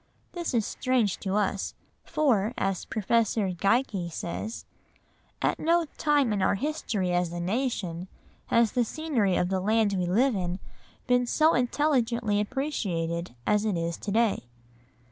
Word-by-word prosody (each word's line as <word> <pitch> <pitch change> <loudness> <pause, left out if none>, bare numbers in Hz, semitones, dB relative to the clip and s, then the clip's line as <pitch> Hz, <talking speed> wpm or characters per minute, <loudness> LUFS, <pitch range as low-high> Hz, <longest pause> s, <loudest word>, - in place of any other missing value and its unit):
This 345 -7 -3
is 225 -3 +2
strange 250 -7 0
to 195 -1 -2
us, 200 -1 -1 0.3
for, 240 -7 +1
as 195 -1 -1
Professor 220 -2 +1
Geikie 195 -1 +1
says, 195 +7 -5 0.8
"At - - +1
no 335 +1 +3
time 290 -7 +3
in 200 - -1
our 190 - +3
history 215 - -2
as 175 -1 +1
a 175 - -4
nation 185 -3 -2 0.4
has 230 -2 +3
the 245 - +2
scenery 235 - 0
of 180 - +1
the 190 -1 0
land 215 +1 +2
we 180 -2 0
live 235 +7 +3
in 180 -1 -2 0.5
been 245 -1 +2
so 310 +5 +4
intelligently 245 -5 +1
appreciated 180 - -2
as 210 0 +2
it 210 -5 0
is 165 0 -2
to - - -6
day." 225 - +1
215 Hz, 145 wpm, -27 LUFS, 185-250 Hz, 0.8 s, so